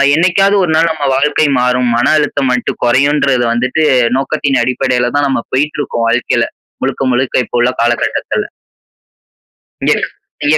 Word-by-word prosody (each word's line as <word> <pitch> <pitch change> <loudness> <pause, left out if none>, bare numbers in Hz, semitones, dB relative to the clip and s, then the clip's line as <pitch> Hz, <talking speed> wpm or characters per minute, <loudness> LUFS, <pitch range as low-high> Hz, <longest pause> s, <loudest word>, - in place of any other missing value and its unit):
என்னைக்காவது 185 +4 +2
ஒருநாள் 165 -1 +2
நம்ம 155 -3 -4
வாழ்க்கை 150 +2 +1
மாறும் 125 0 +1
மன 120 - +1
அழுத்தம் 145 -2 -1
மட்டும் 125 - -3
குறையும்ன்றது 135 0 +2
வந்துட்டு 130 +6 0 0.4
நோக்கத்தின் 135 -1 0
அடிப்படையில 125 -1 0
தான் 145 0 +1
நம்ம 130 -3 -1
போயிட்டு 150 +3 0
இருக்கோம் 115 -4 -2
வாழ்க்கையில. 120 +1 0 0.4
முழுக்க, - - -2
முழுக்க 125 +1 -1
இப்ப - - -8
உள்ள 120 - +3
காலகட்டத்துல. 120 0 -1 1.4
இங்க, - - +4 0.5
இங்க 150 +1 +4
135 Hz, 135 wpm, -13 LUFS, 125-150 Hz, 1.4 s, இங்க